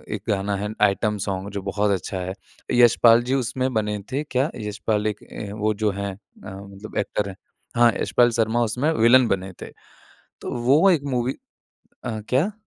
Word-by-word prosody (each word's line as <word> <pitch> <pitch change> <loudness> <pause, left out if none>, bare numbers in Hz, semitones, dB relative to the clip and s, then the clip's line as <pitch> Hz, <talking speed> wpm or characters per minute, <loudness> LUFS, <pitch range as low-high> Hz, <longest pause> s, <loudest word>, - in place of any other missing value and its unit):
एक 105 - -7
गाना 100 0 0
है 105 +1 -3
आइटम 105 +1 +2
सॉन्ग 95 0 -3
जो 100 0 -4
बहुत 100 +1 0
अच्छा 95 0 -2
है। 90 +1 -4 0.4
यशपाल 120 -1 +6
जी 125 +2 -1
उसमें 130 0 -1
बने 105 -2 0
थे 140 +3 -1
क्या 135 0 0
यशपाल 105 0 -2
एक 105 -1 -2 0.4
वो 105 +1 +1
जो 105 - +3
है 100 0 -4
अ, - - -14 0.3
मतलब 100 +2 -9
एक्टर 105 -1 -1
है। 95 - -8 0.4
हाँ, 120 0 +5
यशपाल 120 -1 +3
शर्मा 115 +1 +1
उसमें 125 +7 0
विलेन 120 -1 +5
बने 95 -2 -2
थे, - - -8 0.7
तो - - -5
वो 145 +10 +5
एक 165 -6 +2
मूवी 125 +1 0 0.7
अ, 115 -3 -3
क्या? 145 +11 +2
110 Hz, 175 wpm, -23 LUFS, 100-120 Hz, 0.7 s, यशपाल